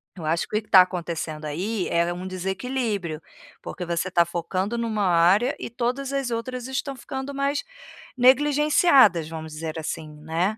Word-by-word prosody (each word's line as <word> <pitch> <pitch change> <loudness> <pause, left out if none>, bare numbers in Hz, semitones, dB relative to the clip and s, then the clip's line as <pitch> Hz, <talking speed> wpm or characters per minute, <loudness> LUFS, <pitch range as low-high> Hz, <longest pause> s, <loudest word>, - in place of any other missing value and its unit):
Eu 170 - -9
acho 165 +2 0
que - - -5
o - - +4
que - - -10
que 215 - -25
está 185 - +8
acontecendo 170 -4 -3
aí 185 +7 -2
é 170 +1 +1
um 180 +1 -6
desequilíbrio, 190 -2 -3 0.4
porque 180 - -6
você 170 +2 -1
está 170 -2 +4
focando 185 +6 -3
em 235 - -1
uma 215 -2 -1
área 180 - +4
e - - -5
todas 255 +3 -2
as 275 -3 -1
outras 250 +2 -4
estão 270 +1 -3
ficando 265 +2 -6
mais 280 +1 -1 0.5
negligenciadas, 270 - +5
vamos 160 -1 -7
dizer 160 +1 -5
assim, 155 0 -5
né. 170 +7 -1
190 Hz, 175 wpm, -24 LUFS, 170-255 Hz, 0.5 s, está